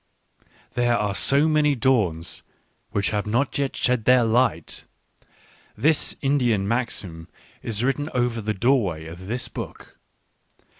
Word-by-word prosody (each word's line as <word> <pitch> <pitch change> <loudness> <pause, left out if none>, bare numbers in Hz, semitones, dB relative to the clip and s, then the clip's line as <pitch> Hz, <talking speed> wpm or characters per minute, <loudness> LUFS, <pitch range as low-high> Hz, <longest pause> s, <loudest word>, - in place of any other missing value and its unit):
" - - -32
There 120 -1 +2
are 105 -2 -1
so 140 +8 +3
many 150 -2 +3
dawns 105 -11 0 0.5
which 100 0 0
have 105 0 -2
not 120 +6 0
yet 140 -1 -1
shed 125 -3 +1
their 125 -1 +5
light" 115 -8 0 0.5
— - - -30
this 155 -1 +2
Indian 125 -8 +1
maxim 100 -8 -3 0.3
is 110 0 -2
written 140 +3 0
over 120 -2 0
the 105 0 -2
doorway 100 - +1
of 85 +3 -9
this 120 +4 -3
book. - - -9
120 Hz, 140 wpm, -24 LUFS, 100-130 Hz, 0.5 s, their